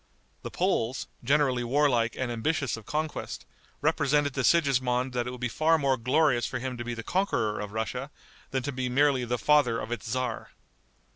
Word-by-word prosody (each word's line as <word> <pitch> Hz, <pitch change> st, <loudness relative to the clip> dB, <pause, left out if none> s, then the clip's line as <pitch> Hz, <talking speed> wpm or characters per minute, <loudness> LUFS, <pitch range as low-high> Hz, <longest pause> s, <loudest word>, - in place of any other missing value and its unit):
The -, -, -6 dB
Poles, 115 Hz, +3 st, 0 dB, 0.2 s
generally 135 Hz, -4 st, +2 dB
warlike 120 Hz, -2 st, +2 dB
and 130 Hz, -2 st, -2 dB
ambitious 140 Hz, +4 st, -1 dB
of 115 Hz, -2 st, -12 dB
conquest, 155 Hz, +1 st, -3 dB, 0.4 s
represented 145 Hz, -2 st, +2 dB
to 130 Hz, -, -1 dB
Sigismond 130 Hz, -5 st, +2 dB
that 120 Hz, -1 st, -1 dB
it -, -, -2 dB
would 125 Hz, 0 st, -7 dB
be 125 Hz, -, -1 dB
far 160 Hz, +6 st, +2 dB
more 140 Hz, -3 st, +2 dB
glorious 130 Hz, +1 st, +2 dB
for 130 Hz, -, -3 dB
him 130 Hz, 0 st, -4 dB
to 120 Hz, -, -4 dB
be 120 Hz, 0 st, -4 dB
the 115 Hz, -, -6 dB
conqueror 115 Hz, -, 0 dB
of 105 Hz, -1 st, -5 dB
Russia 110 Hz, -1 st, -3 dB, 0.4 s
than 130 Hz, -1 st, -2 dB
to 140 Hz, -, -2 dB
be 130 Hz, -1 st, -2 dB
merely 135 Hz, -1 st, +3 dB
the 120 Hz, +1 st, -1 dB
father 140 Hz, -5 st, +3 dB
of 115 Hz, -, -6 dB
its 120 Hz, -, -4 dB
tzar. 130 Hz, +3 st, -3 dB
130 Hz, 190 wpm, -28 LUFS, 120-145 Hz, 0.4 s, merely